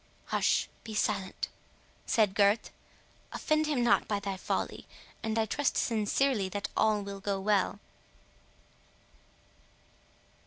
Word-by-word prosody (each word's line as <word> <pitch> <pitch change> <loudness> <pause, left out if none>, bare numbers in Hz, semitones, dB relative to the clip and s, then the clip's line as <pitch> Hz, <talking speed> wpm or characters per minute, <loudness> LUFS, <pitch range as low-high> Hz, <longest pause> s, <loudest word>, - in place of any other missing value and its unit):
"Hush—be 220 -1 0
silent," 200 -3 -1 0.6
said 210 -4 +3
Gurth. 200 +2 +3 0.6
"Offend 310 0 +1
him 280 -5 +1
not 240 - +3
by 205 -1 0
thy 195 -1 -3
folly, 185 - -3 0.3
and 220 0 -2
I 220 - +3
trust 285 +5 0
sincerely 220 -1 +1
that 205 +2 -3
all 210 -2 +2
will 200 0 -6
go 195 0 -2
well." 200 0 +1
210 Hz, 110 wpm, -30 LUFS, 200-230 Hz, 0.6 s, said